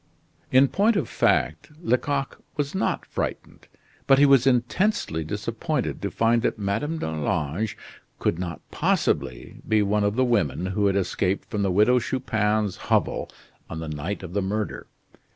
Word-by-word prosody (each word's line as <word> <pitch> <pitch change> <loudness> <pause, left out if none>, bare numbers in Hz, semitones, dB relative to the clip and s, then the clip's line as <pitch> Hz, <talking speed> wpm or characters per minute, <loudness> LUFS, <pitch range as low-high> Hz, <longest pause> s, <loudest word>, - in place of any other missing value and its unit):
In 130 +2 +6
point 210 - +2
of 200 - 0
fact, 75 - +1
Lecoq 140 -1 -1 0.2
was 145 -1 -1
not 190 - -1
frightened, - - -5 0.4
but 135 - +6
he 145 - +6
was 135 -2 +5
intensely 125 - +1
disappointed 115 - -3
to 100 - -2
find 115 +5 +2
that - - 0
Madame 110 +11 -2
d'Arlange 80 - -2 0.4
could 85 - -1
not 85 -4 -5
possibly 60 - -1
be 110 -1 +3
one 105 +1 +1
of 100 +1 +1
the 130 +1 +3
women 95 - +1
who 100 +2 +1
had 100 - +1
escaped 95 0 -1
from 105 - -1
the 100 - +1
Widow 105 +7 +4
Chupin's 110 -5 0
hovel - - +1 0.4
on 80 - -5
the 80 - -5
night 80 +7 -4
of 90 -1 -7
the 100 - +1
murder. 105 +2 -3
105 Hz, 155 wpm, -25 LUFS, 95-130 Hz, 0.4 s, In